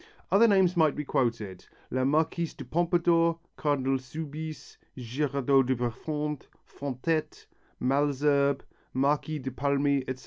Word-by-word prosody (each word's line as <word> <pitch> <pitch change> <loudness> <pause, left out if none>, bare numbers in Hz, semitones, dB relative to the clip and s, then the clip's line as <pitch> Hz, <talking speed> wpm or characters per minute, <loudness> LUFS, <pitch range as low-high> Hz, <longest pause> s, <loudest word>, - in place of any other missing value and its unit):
Other 210 +5 +6
names 190 -4 +4
might 160 -3 +3
be 150 - -3
quoted, 115 -9 -2 0.2
La 130 +1 0
Marquise 160 +3 0
de - - -8
Pompadour, 170 0 +2 0.2
Cardinal 135 -3 0
Soubise, 155 +3 -7 0.2
Girardot 135 +2 +1
de 130 - +2
Prefond, 150 +5 -3 0.3
Fontette, 140 +4 -3 0.3
Malesherbes, 140 +1 +2 0.3
Marquis 145 +3 +1
de 135 -2 -5
Paulmy, 140 +2 +1
etc. 130 0 -4
145 Hz, 115 wpm, -28 LUFS, 130-160 Hz, 0.3 s, Other